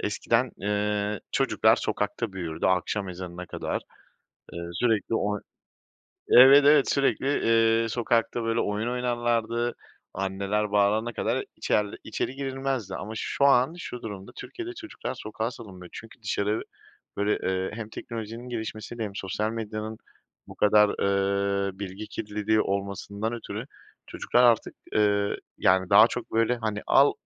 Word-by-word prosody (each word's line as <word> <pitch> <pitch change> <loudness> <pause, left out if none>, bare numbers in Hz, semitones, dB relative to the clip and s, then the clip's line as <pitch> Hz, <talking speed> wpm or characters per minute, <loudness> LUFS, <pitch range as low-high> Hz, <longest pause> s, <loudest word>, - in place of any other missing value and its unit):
eskiden, 115 +4 0
ııı, 105 0 -1
çocuklar - - +3
sokakta 105 +1 -2
büyürdü, 85 -4 -3
akşam 95 +2 0
ezanına 90 0 -7
kadar. - - -3 0.7
Iıı, 85 0 -6
sürekli 115 +2 +1
oy 105 -1 -1 0.9
Evet, 135 +3 +9
evet, 145 -1 +6
sürekli, 140 -1 +1 0.6
eee, 115 - -2
sokakta 115 0 0
böyle 115 0 +1
oyun 105 +3 -1
oynarlardı, 120 -1 0 0.4
anneler 100 +2 -1
bağırana 105 +3 +2
kadar - - -1
içer 105 - +1 0.2
içeri 130 - -3
girilmezdi. 135 -4 -3
Ama 105 - -5
şu 140 - -1
an 135 +3 +4
şu 125 -7 -7
durumda 100 -3 -7
Türkiye'de 360 0 -7
çocuklar 330 - -6
sokağa 110 -1 -4
salınmıyor; 95 -7 -11
çünkü 115 +1 -11
dışarı 105 +1 -1 0.6
böyle, 105 +1 +1
ııı, 95 0 -1
hem 110 -1 -6
teknolojinin 115 +2 -7
gelişmesi 110 0 -5
hem 105 -3 -3
sosyal 105 +3 -2
medyanın 110 -1 -5 0.5
bu - - -11
kadar, 105 0 +5
ııı, 100 0 0
bilgi 100 +1 -6
kirliliği 105 0 -1
olmasından 100 +2 -2
ötürü 120 - -6 0.4
çocuklar 125 - +1
artık, 120 -2 +3 0.2
ııı, 100 -1 +2 0.2
yani 95 0 +3
daha 105 +2 +9
çok 120 -1 -6
böyle, 115 +2 +2
hani, 110 -3 -3
al 140 +1 +5
110 Hz, 130 wpm, -26 LUFS, 100-120 Hz, 0.9 s, Evet